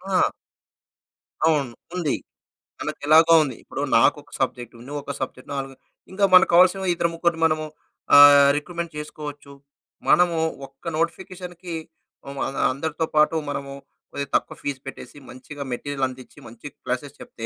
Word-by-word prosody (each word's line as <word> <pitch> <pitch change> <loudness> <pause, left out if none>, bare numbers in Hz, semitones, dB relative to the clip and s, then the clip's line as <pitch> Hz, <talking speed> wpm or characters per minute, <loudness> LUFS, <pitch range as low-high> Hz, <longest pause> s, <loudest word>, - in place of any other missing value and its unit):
ఆ! - - +3 1.2
అవును. 140 -7 +1 0.2
ఉంది. 170 -6 0 0.6
మనకెలాగో 160 +3 +4
ఉంది. 135 -5 -5
ఇప్పుడు - - -6 0.2
నాకొక - - +2
సబ్జెక్ట్, 120 -1 -3
నువ్వొక 145 0 -5
సబ్జెక్ట్ 130 0 -6
నాలుగు 135 -1 -4 0.4
ఇంకా 195 +2 -2
మనకు 185 0 +7
కావాల్సిన 185 +2 +5
ఇద్దరు, 170 0 0
ముగ్గురిని 165 0 -1
మనము 155 -1 +1 0.5
ఆహ్, 145 0 +9
రిక్రూట్మెంట్ 170 +2 -4
చేసుకోవచ్చు. 150 -1 -8 0.6
మనము 175 -2 +4 0.3
ఒక్క 135 +3 -21
నోటిఫికేషన్‌కి 175 +1 -4 0.6
అం 140 - -8 0.3
అందరితో 160 +4 -3
పాటు 155 +2 +4
మనము 140 -1 -5 0.4
కొదిగా 140 -1 -5
తక్కువ - - 0
ఫీజ్ 140 -2 -4
పెట్టేసి, 135 +1 -10
మంచిగా 140 +3 -9
మెటీరియల్ 140 +2 -4
అందిచ్చి, 130 0 -12
మంచి 115 +5 -11 0.2
క్లాసెస్ 130 +3 -4
చెప్తే, 115 - -9
145 Hz, 125 wpm, -23 LUFS, 140-170 Hz, 1.2 s, ఆహ్